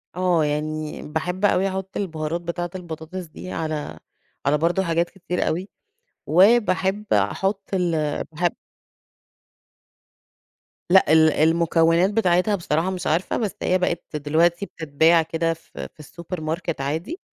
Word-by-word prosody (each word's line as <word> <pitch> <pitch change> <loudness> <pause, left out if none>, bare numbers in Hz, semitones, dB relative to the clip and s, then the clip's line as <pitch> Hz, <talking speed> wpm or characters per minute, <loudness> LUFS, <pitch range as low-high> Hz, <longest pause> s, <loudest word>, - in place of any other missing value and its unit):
آه، 180 -3 +2
يعني 150 +1 -3
باحب 180 +6 -2
أوي 195 -1 +3
أحط 190 0 -5
البهارات 165 -3 -3
بتاعة 175 +1 -3
البطاطس 175 +1 -7
دي 175 +3 -9
على 155 -2 -4 0.5
على 145 +2 +3
برضو 170 +5 +1
حاجات 170 -1 0
كتير 180 -2 -3
أوي، 180 +5 -2 0.6
وباحب 200 +1 +3
أحط 195 +1 +1
ال 160 -5 0
باحب 175 +2 0 2.3
لأ 185 -4 +5
ال 160 0 +6
المكونات 165 +2 +3
بتاعتها 205 -1 +2
بصراحة 170 -1 -1
مش 185 -1 -4
عارفة، 165 +4 0
بس 215 -5 -2
هي 185 - +2
بقت 175 -3 -2
دلوقتي 165 +5 +2
بتتباع 160 0 +2
كده 165 +1 -1
في 165 - -9
في - - -38
السوبر 170 +3 -7
ماركت 160 -1 -3
عادي 165 - -3
170 Hz, 130 wpm, -23 LUFS, 160-185 Hz, 2.3 s, ال